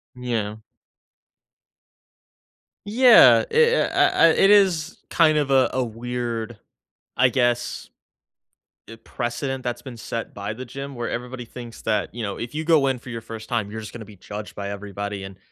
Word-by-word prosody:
Yeah. 115 -4 -3 2.3
Yeah. 235 +2 +7
I 465 +1 +5
uh - - +2
uh, - - +3
I - - +6
It 195 +5 +4
is 185 -6 +3
kind 155 -2 +4
of 145 -2 0
a 135 -1 +4
a 130 - +1
weird, 120 -1 -4 0.6
I 125 - +5
guess, 120 0 -1 1.0
i 115 - -9
precedent 130 +2 -4
that's 120 -1 -3
been 125 -2 -9
set 115 +1 -5
by 100 +1 -4
the 125 +4 -8
gym 140 +3 -7
where 120 -1 -4
everybody 125 +1 -5
thinks 120 0 -10
that, 110 -1 -1
you 120 - -6
know, 100 -3 -4
if 120 0 -6
you 155 +1 -3
go 160 -4 +4
in 130 -2 -1
for 125 - -12
your 115 -1 -5
first 110 +1 -9
time, 110 -4 -1
you're 110 - -5
just 110 - -9
gonna 115 - -8
be 105 -2 -15
judged 105 +3 -8
by 100 0 -5
everybody 100 0 -5
and 95 0 -9
120 Hz, 175 wpm, -23 LUFS, 110-135 Hz, 2.3 s, Yeah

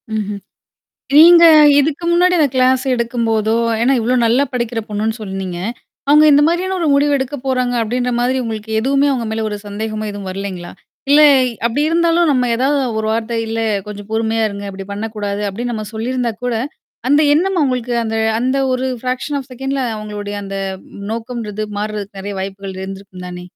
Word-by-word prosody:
ம்ஹ்ம். 205 -1 -3 0.8
நீங்க 340 +2 +9 0.3
இதுக்கு 300 +3 0
முன்னாடி 360 +1 +4
அந்த 300 -3 +4
கிளாஸ் 255 0 +3
எடுக்கும்போதோ 230 -2 0 0.3
ஏன்னா 245 +4 +3
இவ்வளோ 240 +3 +1
நல்லா 245 +5 +3
படிக்கிற 235 -2 -2
பொண்ணுன்னு 215 +2 -2
சொன்னீங்க. 190 -3 -5 0.5
"அவுங்க 300 +1 +6
இந்த 285 +1 +5
மாரியான 365 +3 0
ஒரு 330 - +1
முடிவு 285 +1 +3
எடுக்கப் 265 0 -5
போறாங்க." 255 -2 0
அப்படீன்ற 245 +2 -1
மாதிரி 255 +2 +1
உங்களுக்கு 220 -1 -5
எதுவுமே 275 +4 +2
அவங்க 240 -3 -2
மேல 220 0 -2
ஒரு 210 - -4
சந்தேகமோ 215 +1 -4
எதுவும் 205 -2 -7
வரலைங்களா? 185 -2 -6 0.4
இல்ல 290 +1 +7 0.5
அப்படி 240 +5 -1
இருந்தாலும் 335 0 +2
நம்ம 255 -2 +2
ஏதாவது 275 +4 +1 0.2
ஒரு 220 - -2
வார்த்தை, 230 +1 -2
"இல்ல 225 0 -2 0.3
கொஞ்சம் 205 -1 -8
பொறுமையா 225 0 0
இருங்க. 200 0 -7
அப்படி 195 0 -8
பண்ணக்கூடாது." 205 -1 -4
அப்படீன்னு 240 +5 -4
நம்ம 215 -1 -5
சொல்லி 225 +3 -3
இருந்தா 245 -2 -1
கூட, 245 -1 0 0.5
அந்த 290 +3 +4
எண்ணம் 375 +4 +1
அவங்களுக்கு 250 -4 0
அந்த 225 0 -2 0.2
அந்த 260 +3 0
ஒரு 255 +1 -1
ஃபிராக்ஷன் 255 +4 -3
ஆஃப் 270 -1 -9
செகண்ட்ல 270 +2 -3 0.2
அவங்களுடைய 210 -1 -6
அந்த 195 0 -6 0.6
நோக்கம்ன்றது 225 -3 -4
மாறுறதுக்கு 205 -1 -5
நெறைய 200 +1 -5
வாய்ப்புகள் 195 0 -6
இருந்திருக்கும் 190 -1 -8
தானே. 180 0 -8
230 Hz, 165 wpm, -17 LUFS, 210-265 Hz, 0.8 s, நீங்க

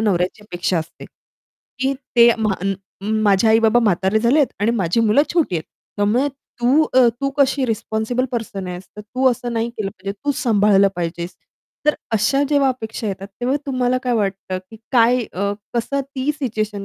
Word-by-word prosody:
नवऱ्याची 190 -1 0
अपेक्षा 175 -3 -1
असते. 160 - -7 0.8
की 265 +1 +1 0.2
ते 235 0 +8
म्हाण 195 -3 0 0.5
माझे 205 +1 +3
आई-बाबा 225 +1 +4
म्हातारे 195 -1 +2
झालेत 255 +5 +3
आणि 215 - +2
माझी 200 -2 +1
मुलं 225 +5 +4
छोटी 335 - +1
आहेत. 160 - -3 0.3
त्यामुळे 225 +8 +2 0.3
तू 260 +6 +4
अ, 255 -1 +7
तू 275 0 0
कशी 275 -1 +3
रिस्पॉन्सिबल 220 +2 -1
पर्सन 215 -5 -4
आहेस, 180 0 -6 0.2
तू 255 +5 +1
असं 240 0 -4
नाही 230 0 -1
केलं 215 -4 -4
पाहिजे, 195 +1 -6
तू 290 - +2
सांभाळलं 205 -3 +4
पाहिजेस. 170 +1 -4 0.5
तर 300 - +5 0.2
अशा 225 +6 +2
जेव्हा 285 -2 +3
अपेक्षा 225 -3 -4
येतात, 195 0 -5
तेव्हा 255 +3 +1
तुम्हाला 255 -2 +1
काय 250 - 0
वाटतं 195 -3 -2
की 225 - -11 0.2
काय, 245 0 +4
अ, 200 +2 -1 0.2
कसं 240 +4 0
ती 275 +1 -3
सिच्युएशन 215 -6 -3
225 Hz, 165 wpm, -20 LUFS, 200-255 Hz, 0.8 s, ते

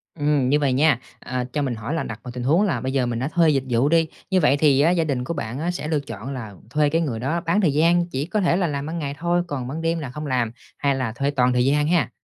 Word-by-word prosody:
Ừm, 145 -4 +1
như 150 - +3
vầy 140 -3 +1
nha, 140 -2 +3 0.2
ờ, 125 -1 -3
cho 150 - 0
mình 130 -4 -1
hỏi 115 +7 -5
là 165 - -1
đặt 110 0 -6
vào 125 - -7
tình 125 0 -5
huống 160 +9 +3
là 205 -4 0
bây 130 - -2
giờ 130 -2 +2
mình 120 -1 -2
đã 130 - -1
thuê 165 -2 +4
dịch 135 -3 +2
vụ 125 +4 +2
đi, 165 0 +3 0.2
như 190 - +3
vậy 145 -4 +3
thì 140 -2 +4
á 165 - +4
gia 175 -2 +2
đình 135 -5 -1
của 170 - -3
bạn 120 -4 -4
á 170 +3 -1
sẽ 175 -4 -5
lựa 155 -2 +1
chọn 115 0 -7
là 110 -6 -7 0.2
thuê 150 +3 +2
cái 165 +3 +1
người 130 -9 -2
đó 155 +8 -1
bán 175 +4 +1
thời 155 -7 +2
gian, 170 +3 +3
chỉ 135 -2 -2
có 210 +5 -1
thể 175 -2 +2
là 180 -3 +1
làm 140 -1 -3
ban 165 +2 -4
ngày 140 -2 -4
thôi, 175 +1 +1
còn 130 -6 -4
ban 155 +5 -4
đêm 165 0 0
là 140 - -5
không 150 +5 -6
làm, 125 -5 0 0.3
hay 140 -1 +1
là 130 -4 -2
thuê 140 +5 -1
toàn 125 -2 +2
thời 125 0 +2
gian 150 +2 +2
ha? 170 -2 +2
145 Hz, 310 wpm, -23 LUFS, 130-165 Hz, 0.3 s, thuê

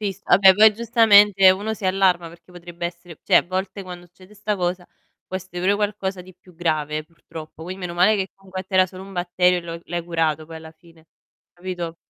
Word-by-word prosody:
sì, 205 -2 -2
s - - -20
ah 175 - +4
beh 190 -1 +7
poi, 215 +2 +6
giustamente, 210 -4 +5
uno 205 +4 -2
si 205 - -11
allarma 185 -3 +1
perché 170 +1 -18
potrebbe 175 -1 -7
essere 170 -1 -11
cioè - - +3
a - - +5
volte 190 +2 -5
quando 180 -1 -10
succede 185 +3 -20
'sta 210 0 -3
cosa, 180 -1 -3 0.4
può 185 - -5
essere 185 -1 -8
pure 190 +3 +2
qualcosa 205 -2 -3
di 185 0 -16
più 180 0 -21
grave, 155 -2 -2
purtroppo. 160 -1 -12
Quin 185 +3 -7
meno 180 -2 -6
male 185 +5 +3
che 190 -1 -3
comunque 190 -1 -8
a - - -10
te 190 - -10
era 185 0 +5
solo 185 +1 -11
un 195 - -12
batterio 180 0 +1
e - - -5
lo 165 0 -8
l'hai 175 0 -4
curato 160 -2 -1
poi 165 0 -10
alla 160 0 -12
fine, 165 -1 -22 0.5
capito? 175 -2 -6
180 Hz, 230 wpm, -22 LUFS, 170-195 Hz, 0.5 s, beh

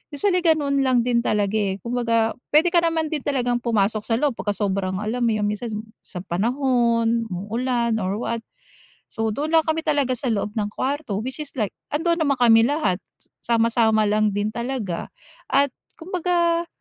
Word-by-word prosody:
Usually 365 +3 +2
ganun 300 -5 +2
lang 255 -3 +3
din 240 -1 +2
talaga, 205 -4 0
eh, 195 -2 0
kumbaga 230 -2 +1 0.2
puwede 335 +3 +5
ka 345 - +5
naman 325 -2 0
din 310 - -1
talagang 245 -4 0
pumasok 220 -3 +1
sa 225 - +2
loob 285 +4 +1
pagka 205 -1 -1
sobrang 195 -2 -1
alam 225 +4 -2
mo 230 - +2
yung 210 - -1
minsan 210 +3 -4 0.3
sa 180 -3 -8
panahon 235 +2 +1
uulan 230 +4 -1
or 190 0 -1
what. 230 +1 -2 0.8
So, 225 -1 0
dun 300 +8 -2
lang 325 - +6
kami 315 0 -2
talaga 285 -4 +1
sa 265 - -3
loob 210 -3 0
ng 210 - 0
kwarto 270 -7 -2
which 260 +5 -5
is 300 -2 -6
like 215 -6 -1 0.2
andoon 335 +3 +1
naman 290 -4 +2
kami 225 -1 +6
lahat 255 - 0 0.5
sama, 230 -1 +2
sama 220 -2 +3
lang 215 0 +2
din 205 +1 -1
talaga 235 -6 -3 0.4
at 280 0 +2 0.2
kumbaga 340 -1 0
240 Hz, 175 wpm, -23 LUFS, 215-290 Hz, 0.8 s, lang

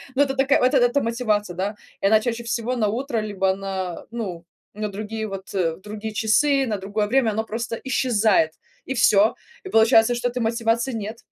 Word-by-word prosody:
Ну, 280 - +3
это 270 -1 -2
такая, 270 +2 +3
вот, 255 +2 +3
это 250 +1 +3
мотивация, 215 -5 -1
да. 195 +4 -2 0.3
И - - -1
она 215 +2 +5
чаще 235 +1 -3
всего 235 +2 -2
на 220 -4 +1
утро 240 +2 -2
либо 195 -2 0
на, 190 -2 -5
ну, 190 -8 -5 0.3
на 210 0 -3
другие, 215 +2 -5
вот, 195 -1 -8 0.3
другие 210 +1 -6
часы, 270 +6 +2
на 215 -2 -1
другое 205 +2 -2
время 240 -1 +2
оно 220 +2 -1
просто 230 +1 -4
исчезает 220 -10 +2 0.3
и 265 - -3
всё. 215 -3 +4 0.3
И - - -6
получается, 225 -2 +5
что 245 +1 -1
этой 245 +1 -4
мотивации 230 +2 0
нет. 220 +1 -5
220 Hz, 185 wpm, -23 LUFS, 205-245 Hz, 0.3 s, она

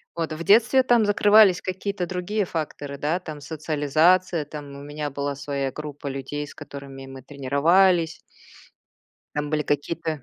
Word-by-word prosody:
Вот. 165 -2 -2
В 160 +2 -5
детстве 240 +8 +5
там 240 -3 +4
закрывались 205 -2 +5
какие-то 190 0 -3
другие 185 +4 -2
факторы, 145 -4 -5
да, 155 +5 -1
там 155 -5 -8
социализация, 155 +3 +1
там 150 0 -8
у 140 - -9
меня 145 0 -5
была 140 0 -3
своя 140 -1 -3
группа 145 -1 -7
людей, 135 +2 -4
с 145 - -12
которыми 135 -1 -10
мы 135 0 -10
тренировались. 160 +6 +2 1.1
Там 150 0 -2
были 155 -1 +1
какие-то 155 +1 -2
155 Hz, 145 wpm, -24 LUFS, 140-180 Hz, 1.1 s, детстве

